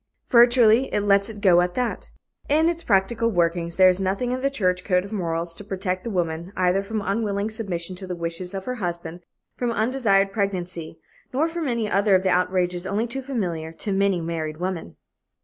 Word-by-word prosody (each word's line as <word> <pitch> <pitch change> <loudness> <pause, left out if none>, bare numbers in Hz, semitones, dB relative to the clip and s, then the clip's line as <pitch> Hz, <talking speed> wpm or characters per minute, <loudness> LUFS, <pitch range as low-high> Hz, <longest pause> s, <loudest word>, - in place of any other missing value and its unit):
Virtually, 240 0 +5
it 210 - +1
lets 200 0 +3
it 210 -2 -9
go 175 -3 +6
at 180 0 -1
that. 250 -2 -2 0.4
In 310 +3 +4
its 340 0 -3
practical 230 +2 +2
workings, 170 -3 0
there 185 -1 +7
is 185 0 +4
nothing 195 +6 -1
in 255 +1 -2
the 275 - +2
church 185 -9 0
code 180 -1 +1
of 200 - -10
morals 170 -4 -2
to 205 - -10
protect 185 -2 -3
the 235 - -4
woman, 170 -2 -2
either 185 +1 +2
from 210 +1 -4
unwilling 205 0 -1
submission 185 -5 -4
to 190 0 -8
the 180 - -4
wishes 170 +2 -5
of 190 - -5
her 255 - -2
husband, 170 -1 -4 0.4
from 245 - -1
undesired 220 -4 +2
pregnancy, 180 -5 -3 0.3
nor 290 +5 +1
from 330 -2 -3
any 235 -3 -1
other 200 0 +3
of 185 - +2
the 190 - +2
outrages 180 0 0
only 205 +4 0
too 270 +3 -5
familiar 180 -12 -3
to 165 +5 -5
many 195 -2 +2
married 160 -2 -4
women. 175 - -4
195 Hz, 200 wpm, -24 LUFS, 180-225 Hz, 0.4 s, there